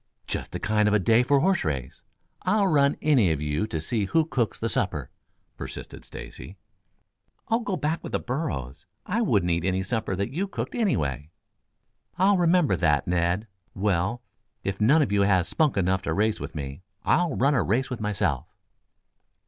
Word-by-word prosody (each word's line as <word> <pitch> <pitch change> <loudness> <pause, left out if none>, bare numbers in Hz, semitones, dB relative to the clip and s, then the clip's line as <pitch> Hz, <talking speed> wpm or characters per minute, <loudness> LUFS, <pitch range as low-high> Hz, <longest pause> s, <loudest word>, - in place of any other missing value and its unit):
"Just - - -4
the - - -4
kind 105 -1 +2
of 105 - +3
a - - +4
day 110 +5 +4
for 140 +3 +3
a - - +2
horse 190 +2 +2
race. 65 -4 -4 0.4
I'll 205 +2 +2
run 145 -6 +3
any 130 - +4
of 80 - -1
you 75 +6 -1
to 80 - -3
see 105 +6 -1
who 160 +11 +2
cooks 125 -8 -1
the - - -2
supper," - - -1 0.5
persisted - - -8
Stacy. 95 - -10 0.9
"Oh, 225 - +3
go 205 -6 -2
back 155 +2 -1
with - - -7
the - - +1
burros. 75 - -4 0.2
I - - 0
wouldn't 85 0 +2
eat 85 0 0
any 95 +1 0
supper 110 -1 -2
that 100 +2 -2
you 185 +8 -2
cooked, - - -5
anyway." 75 - -1 0.9
"I'll 195 +2 +4
remember 175 -2 +3
that, 75 -4 +2
Ned. 90 +4 +1 0.3
Well, 100 +4 0 0.4
if 100 +1 -3
none 150 +9 +5
of 130 - -3
you 100 -1 +3
has 95 -3 +3
spunk 150 - +1
enough 95 0 +1
to 100 - -2
race 110 +1 +1
with - - -7
me, 70 +1 -6 0.2
I'll 170 -3 +2
run 140 +3 +3
a 125 - +3
race 125 +8 0
with 120 -3 -4
myself." 95 - -1
105 Hz, 185 wpm, -26 LUFS, 90-150 Hz, 0.9 s, none